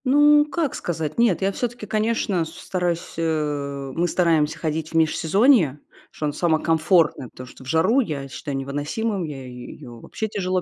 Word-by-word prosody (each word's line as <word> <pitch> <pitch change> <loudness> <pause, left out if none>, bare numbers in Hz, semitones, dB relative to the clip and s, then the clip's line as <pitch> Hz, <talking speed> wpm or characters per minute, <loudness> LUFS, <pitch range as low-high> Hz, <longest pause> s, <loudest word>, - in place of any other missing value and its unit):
Ну 295 +2 +6
как 300 -2 -2
сказать? 160 0 -3
Нет, 230 -7 +3
я 195 +1 +2
всё-таки, 240 +1 -4
конечно, 215 -4 0
с - - -8
стараюсь, 175 -2 -3
э 145 -4 -2
мы 175 +1 +1
стараемся 160 -3 +2
ходить 160 -1 -3
в - - -14
межсезонье, 165 - +3 0.3
что 155 - -5
оно 145 - -1
само 160 +1 +2
комфортное, 160 - +2
потому 125 - -11
что 130 - -14
в - - -13
жару 165 - +3
я 150 - -2
считаю 140 0 -5
невыносимым, 150 +10 -2
я 140 -5 -6
её 125 -1 -10
вообще 220 - -5
тяжело 185 -3 -1
165 Hz, 170 wpm, -23 LUFS, 145-205 Hz, 0.3 s, Ну